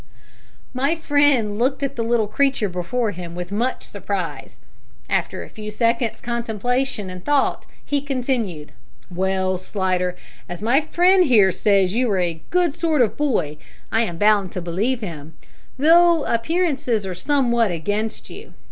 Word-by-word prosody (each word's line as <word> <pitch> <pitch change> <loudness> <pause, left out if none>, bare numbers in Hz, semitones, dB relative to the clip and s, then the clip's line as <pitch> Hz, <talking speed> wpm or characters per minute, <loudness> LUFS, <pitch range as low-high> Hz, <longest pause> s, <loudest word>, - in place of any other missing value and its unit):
My 275 +5 +1
friend 285 -9 +2
looked 265 +3 0
at 275 - -2
the 235 - -2
little 230 -1 +1
creature 265 +1 +1
before 195 +6 -2
him 175 -2 -8
with 175 +1 -6
much 235 +6 -1
surprise. - - -5 0.5
After - - -1
a - - -12
few 215 -1 -7
seconds' 230 +1 0
contemplation 235 0 -2
and 180 0 -9
thought, 290 -2 +1 0.2
he 285 -1 0
continued 245 - -2 0.4
"Well, 185 0 0
Slidder, 185 -2 -1 0.3
as 175 +2 -7
my 250 +6 +3
friend 360 +4 +4
here 210 -8 +5
says 195 0 +2
you 245 +1 +1
are 190 - +1
a 170 -3 -2
good 355 -4 +2
sort 310 -5 +2
of 220 - -1
boy, 220 - -1 0.3
I 225 - +2
am 175 -7 -2
bound 205 -2 +3
to - - -3
believe 205 +9 -1
him, 160 -5 -8 0.4
though 335 +2 +5
appearances 265 - 0
are 185 - -4
somewhat 235 +1 +1
against 205 +6 -3
you. - - -12
225 Hz, 150 wpm, -21 LUFS, 185-270 Hz, 0.5 s, here